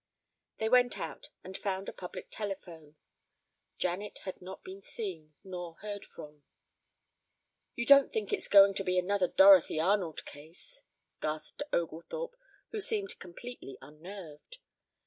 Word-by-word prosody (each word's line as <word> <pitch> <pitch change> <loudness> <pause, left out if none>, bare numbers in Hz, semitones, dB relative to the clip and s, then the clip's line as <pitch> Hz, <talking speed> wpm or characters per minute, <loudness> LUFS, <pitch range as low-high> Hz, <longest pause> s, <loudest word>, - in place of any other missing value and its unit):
They 220 - 0
went 245 +1 +4
out - - -6
and 190 - -8
found 195 -1 -2
a - - -5
public 180 - -8
telephone. 175 -7 -6 0.8
Janet 185 +4 -2
had 185 - -6
not 185 +1 -9
been 190 +1 -9
seen 170 -8 -6
nor 175 -3 -6
heard 205 +1 -6
from. 150 -2 -12 1.3
"You 235 - -1
don't 280 +1 +7
think 210 -2 -2
it's - - -1
going 200 -1 +8
to 195 - -2
be 185 -1 0
another 185 +1 +2
Dorothy 190 -5 +7
Arnold 180 -1 +1
case?" 165 - -13 0.4
gasped 155 - -4
Oglethorpe, 320 - -3 0.4
who 435 - -3
seemed 400 -2 -1
completely 185 - -9
unnerved. 160 - -11
190 Hz, 130 wpm, -32 LUFS, 165-210 Hz, 1.3 s, going